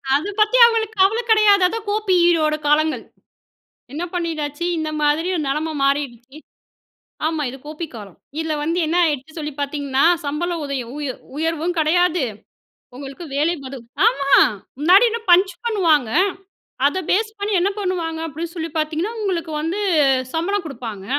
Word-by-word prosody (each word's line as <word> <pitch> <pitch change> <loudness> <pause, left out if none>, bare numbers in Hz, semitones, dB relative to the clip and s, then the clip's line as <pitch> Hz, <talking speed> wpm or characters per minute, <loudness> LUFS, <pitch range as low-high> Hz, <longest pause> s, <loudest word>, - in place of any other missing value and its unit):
அத 300 +7 -1
பத்தி 425 +3 +4
அவுங்களுக்கு 445 -2 0
கவலை 420 +5 +3
கிடையாது. 425 -3 +5
அதான் 440 +2 -5
கோ 410 - +1
பி 375 - +4 0.2
யோட 305 -1 +1
காலங்கள். 310 +1 +2 0.9
என்ன 315 +5 -3
பண்ணிட்டாச்சு? 320 -3 -3
இந்த 310 -1 -2
மாதிரி 300 +4 +1
ஒரு 315 - -1
நிலைமை 310 +3 -1
மாறிடுச்சு. 275 -1 -2 0.9
ஆமா. 315 -1 -1
இது 265 - -9
கோ 305 - -6
பி 335 - -2
காலம். 205 -5 -10 0.2
இதுல 320 -1 -2
வந்து 330 +3 -1
என்ன 330 - 0
ஆயிடுச்சுன்னு 310 +1 -3
சொல்லி 300 -1 -4
பாத்தீங்கன்னா, 280 -1 0 0.2
சம்பளம் 330 +3 -2
உதயம் 260 -4 -4
உயர் 280 -4 -4 0.2
உயர்வும் 325 +2 -1
கிடையாது. 350 +1 +2 0.7
உங்களுக்கு 275 +5 -8
வேலைபளு 280 -3 -2 0.3
ஆமா. 280 - +1 0.5
முன்னாடி 365 +9 +6
என்ன 465 - -3
பஞ்ச் 375 +2 +5
பண்ணுவாங்க. 325 - +2 0.8
அத 335 - -2
பேஸ் 435 +3 0
பண்ணி, 410 +1 -2
என்ன 390 - +2
பண்ணுவாங்க, 345 -4 -2
அப்படின்னு 325 +3 -6
சொல்லி 330 -1 -4
பாத்தீங்கன்னா 315 +7 -1
உங்களுக்கு 350 -5 -2
வந்து 335 +6 -2 0.5
சம்பளம் 360 +3 -1
குடுப்பாங்க. 230 -9 -7
320 Hz, 145 wpm, -20 LUFS, 290-365 Hz, 0.9 s, முன்னாடி